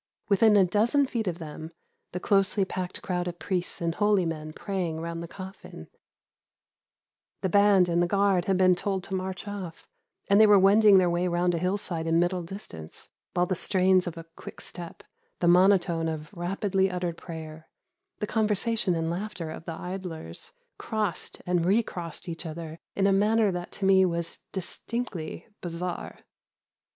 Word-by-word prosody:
Within 210 +1 +5
a 195 - +6
dozen 225 +9 +2
feet 235 -5 -3
of 175 -2 -1
them, 160 -1 -8 0.4
the 180 - -4
closely 195 +1 +2
packed 185 -1 -5
crowd 180 -1 -2
of 175 -1 -5
priests 180 -1 -2
and 165 -1 0
holy 205 -1 +2
men 155 -2 -4
praying 175 -3 -3
round 165 0 -4
the 170 - -6
coffin. 190 +2 -10 1.5
The 190 - 0
band 200 -1 +5
and 170 0 +2
the 175 - +2
guard 195 -1 +2
had 190 -1 +2
been 185 -1 +5
told 190 +1 -2
to 190 - -8
march 190 +1 -4
off, 190 -5 -7 0.4
and 200 +1 +6
they 215 - +8
were 205 -1 +7
wending 200 +1 +6
their 185 -1 +4
way 175 +1 +1
round 175 0 +1
a 170 - 0
hillside 180 -2 -2
in 165 0 +3
middle 175 +1 +1
distance; 165 - -8 0.3
while 180 - +3
the 185 - -1
strains 185 0 +2
of 170 -1 -5
a 165 - -8
quick - - -10
step, 170 -1 -7 0.4
the 175 - +1
monotone 175 -2 +4
of 155 +2 -5
rapidly 190 +2 0
uttered 180 -2 -2
prayer, 160 -2 -9 0.5
the 210 - -2
conversation 215 -2 +1
and 165 0 -1
laughter 175 -3 -4
of 160 - -9
the 165 -1 -6
idlers, 180 - -7 0.3
crossed 210 -6 -3
and 180 -1 +1
re 200 +7 +3
crossed 175 -2 -7
each 165 -1 -5
other 160 0 -7 0.2
in 195 - +2
a 195 - +4
manner 210 +1 +3
that 175 -1 -5
to 195 - -3
me 190 0 +6
was 170 -2 -2
distinctly 190 -3 -5 0.2
bizarre. 175 0 -5
180 Hz, 170 wpm, -27 LUFS, 170-200 Hz, 1.5 s, they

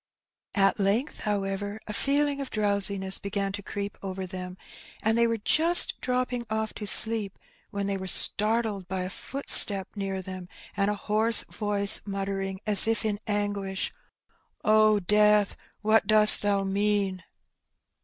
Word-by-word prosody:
At 195 0 +1
length, 210 +9 -2
however, 205 0 -4
a 210 - -7
feeling 280 +5 -1
of 270 - -7
drowsiness 200 -2 0
began 200 -1 -4
to 205 +1 -7
creep 200 0 -7
over 190 -1 -7
them, 180 0 -9 0.5
and 220 +1 +1
they 235 0 +1
were 230 0 -2
just 325 +11 +5
dropping 250 -1 -3
off 220 0 -4
to 210 - -8
sleep 215 -1 +3 0.3
when 200 -2 -5
they 200 0 -3
were 190 0 -8
startled 210 -1 +2
by 185 0 -4
a 185 - -7
footstep 205 -8 +2
near 195 -2 -5
them, 185 -1 -10 0.3
and 200 0 -1
a 210 - -2
hoarse 220 +3 +3
voice 205 -1 +1
muttering, 195 -1 -6
as 210 0 +5
if 225 0 -2
in 205 -1 -3
anguish, 205 -2 -4 0.7
'^O 215 -2 +2
Death, 210 0 +2 0.3
what 215 -1 +1
dost 215 0 +7
thou 200 -1 -1
mean? 195 -1 -2
205 Hz, 145 wpm, -25 LUFS, 195-215 Hz, 0.7 s, dost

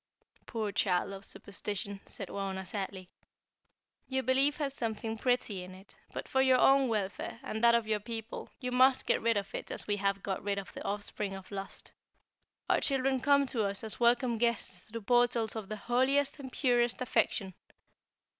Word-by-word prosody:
"Poor 220 -3 -2
child 185 -2 +1
of 195 0 -8
superstition," 200 0 -5
said 195 - -5
Wauna, 190 -1 -4
sadly. 190 -1 -5 1.0
"Your 265 0 -1
belief 270 +3 +3
has 285 -3 -2
something 225 -3 -3
pretty 230 -5 0
in 185 +1 -9
it, 190 +2 -15 0.2
but - - -5
for 265 - +2
your 260 -1 +5
own 270 +1 +5
welfare, 210 0 -2
and 220 -4 -4
that 235 0 +7
of 235 -1 +2
your 215 -1 0
people, 225 +1 -6
you 250 -2 -3
must 255 +1 +5
get - - +2
rid 230 -1 +2
of 200 -1 -4
it - - -5
as - - -1
we 205 -1 0
have 195 0 0
got 190 -2 -2
rid 200 0 -1
of 200 - -6
the - - -7
offspring 205 -1 -3
of 190 0 -11
Lust. 195 -1 -6 0.8
Our - - +3
children 270 -1 +1
come 280 +1 +4
to 235 -4 -1
us 200 0 -1
as 220 - -1
welcome 240 -1 +3
guests 235 0 -1
through 230 +1 -7
portals 240 -1 +2
of 215 -3 -5
the 215 - -4
holiest 270 +6 +1
and 260 -2 -7
purest 240 -3 +2
affection. 200 -5 0
225 Hz, 185 wpm, -31 LUFS, 200-255 Hz, 1.0 s, that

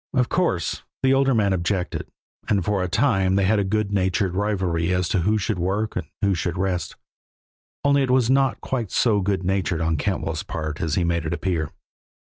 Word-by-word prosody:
Of 125 -2 +2
course 165 - 0 0.2
the 130 0 +4
older 135 -1 +3
man 100 -3 +2
objected, 90 +1 -2 0.4
and 100 -4 +1
for 105 -2 +1
a 90 - 0
time 95 -4 +2
they 100 - +2
had 105 +2 +3
a - - +2
good 105 +1 -1
natured 95 -1 +1
rivalry 90 -4 0
as 90 0 +1
to 95 - +1
who 105 +6 +2
should 105 -2 -2
work 100 +5 -1
and - - -3 0.2
who 100 -1 +3
should 90 +1 -2
rest 95 -1 -2 0.9
only 140 0 +4
it 135 - 0
was 125 -2 +3
not 135 +1 +2
quite 120 -6 -2
so 105 -1 +2
good 95 -1 -1
natured 95 -2 0
on 80 -2 0
Cantwell's 70 - -2
part 75 -1 -5
as 80 -3 0
he 90 - +1
made 85 -2 0
it 80 - -2
appear. 85 -6 -1
95 Hz, 200 wpm, -23 LUFS, 90-110 Hz, 0.9 s, the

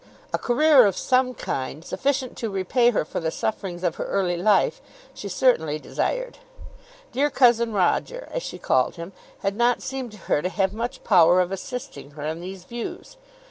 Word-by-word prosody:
A - - +1
career 260 -1 +5
of 195 - -2
some 255 0 +1
kind, 135 +1 -4
sufficient 265 +4 -1
to 225 - -2
repay 200 +6 +2
her 220 - 0
for - - -4
the 165 - -1
sufferings 185 -1 -4
of 175 -3 0
her - - -3
early 185 -3 0
life, 190 +3 +2 0.3
she 200 - -7
certainly 160 - +2
desired. - - -3 0.7
"Dear 290 +2 +1
cousin 235 -4 +4
Roger," 215 - 0
as - - -2
she - - -6
called - - +1
him, 170 +2 -8 0.3
had 195 0 0
not 240 +1 +2
seemed 265 -3 -5
to - - -11
her 145 - +1
to 180 - -1
have 190 0 0
much 240 +4 -4
power 175 -2 +5
of 180 0 +1
assisting 245 - -6
her 145 - -6
in 160 +2 -3
these 185 0 -8
views. 240 - -7
210 Hz, 180 wpm, -24 LUFS, 180-255 Hz, 0.7 s, career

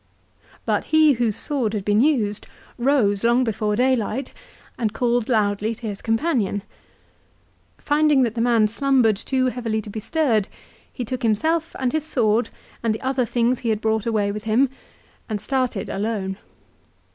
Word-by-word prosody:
But - - 0
he, 315 -2 +5
whose 230 -4 0
sword 255 -8 -1
had 200 -2 -3
been 210 +1 +3
used, 230 -8 +1 0.3
rose 235 -6 +2
long 240 +2 +3
before 215 -2 -1
daylight 255 +1 0 0.4
and 220 -4 -2
called 240 -1 0
loudly 215 -1 +1
to 230 - -10
his 205 -2 -5
companion. 225 - 0 1.1
Finding 295 -2 +3
that 230 -3 0
the 230 - -2
man 230 -2 +3
slumbered 245 -1 +2
too 260 +6 -1
heavily 230 -3 -2
to 205 - -9
be 220 - -5
stirred, 230 -5 +1 0.4
he 245 - -5
took 255 +3 -4
himself 315 +9 0
and 255 -2 0
his 315 -1 0
sword 235 -6 +1 0.3
and 225 -2 0
the - - -8
other 260 -1 0
things 240 +2 +1
he 235 - -2
had 215 -1 +1
brought 220 0 0
away 210 -3 +1
with 210 +1 -6
him 240 +5 +3 0.6
and 215 -2 -2
started 255 -4 -1
alone. 200 -2 -2
230 Hz, 160 wpm, -22 LUFS, 215-260 Hz, 1.1 s, he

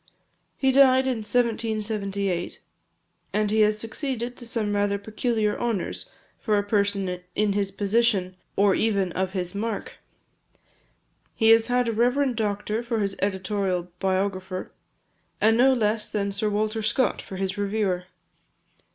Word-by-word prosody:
He 265 -1 +3
died 260 -1 +6
in 260 -2 0
1778; 215 -5 -1 0.7
and 210 -1 +1
he 220 - +2
has 210 0 +3
succeeded 240 +2 -3
to 240 - -8
some 215 -3 -1
rather 205 0 +1
peculiar 215 +1 -1
honours 230 -6 -2 0.3
for 215 -2 +1
a 205 - +1
person 200 -3 0
in 210 -1 +2
his 200 -1 0
position, 200 -2 +1 0.2
or 200 -1 +4
even 200 -4 +1
of 190 +1 -2
his 180 -2 -2
mark. 215 +1 -4 1.4
He 225 -1 +3
has 225 0 +6
had 245 -1 +1
a - - +1
reverend 250 +3 +2
doctor 210 0 -1
for 235 -1 -2
his 200 -2 -1
editorial 190 -2 -1
biographer, 190 -1 -2 0.7
and 220 +1 +4
no 255 +3 +5
less 220 -3 0
than 200 -1 -1
Sir 200 +2 -1
Walter 215 +2 -1
Scott 235 +4 +1
for 190 - -9
his 190 0 -2
reviewer. 200 -3 -1
210 Hz, 140 wpm, -25 LUFS, 195-230 Hz, 1.4 s, died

